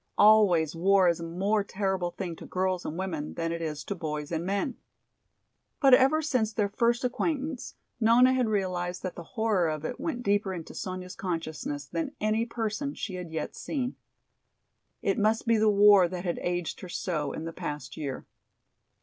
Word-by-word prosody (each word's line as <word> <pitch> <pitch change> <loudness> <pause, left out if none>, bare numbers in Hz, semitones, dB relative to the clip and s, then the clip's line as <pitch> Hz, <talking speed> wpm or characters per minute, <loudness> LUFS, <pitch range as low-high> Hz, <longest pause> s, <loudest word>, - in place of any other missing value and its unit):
Always 195 -7 +5
war 190 +2 +4
is 170 - 0
a - - -5
more 195 +5 0
terrible 190 -3 -1
thing 175 -2 -5
to - - -10
girls 185 -1 -1
and 155 - -4
women 170 -6 -4
than 165 0 -2
it 170 0 -3
is 155 -2 -3
to - - -3
boys 150 -4 -4
and 165 0 -1
men. 200 +7 -1 1.0
But 275 -3 +6
ever 270 +5 +5
since 250 -7 +1
their 210 -2 0
first 235 +4 +1
acquaintance 280 +1 -2 0.2
Nona 240 +3 +6
had 255 -2 +2
realized 180 -3 -1
that 185 - -3
the - - -8 0.2
horror 210 -7 +2
of 155 0 -4
it 250 - -4
went 245 -7 -3
deeper 200 -3 +1
into 165 -2 -8
Sonya's 185 -1 -5
consciousness 160 -5 -4
than 165 +3 -4
any 215 +2 +1
person 230 +4 -3
she 195 - -5
had 180 -2 -6
yet 160 - -4
seen. 260 -4 -3 1.1
It 195 +1 +1
must 215 +2 +2
be 230 -1 +4
the 215 0 +4
war 205 -2 +7
that 180 +1 -6
had 175 - -1
aged 175 -1 -2
her 185 - -9
so 155 -5 -2
in 160 - -5
the 165 - -5
past 150 -1 -5
year. 140 -4 -5
190 Hz, 185 wpm, -28 LUFS, 170-220 Hz, 1.1 s, war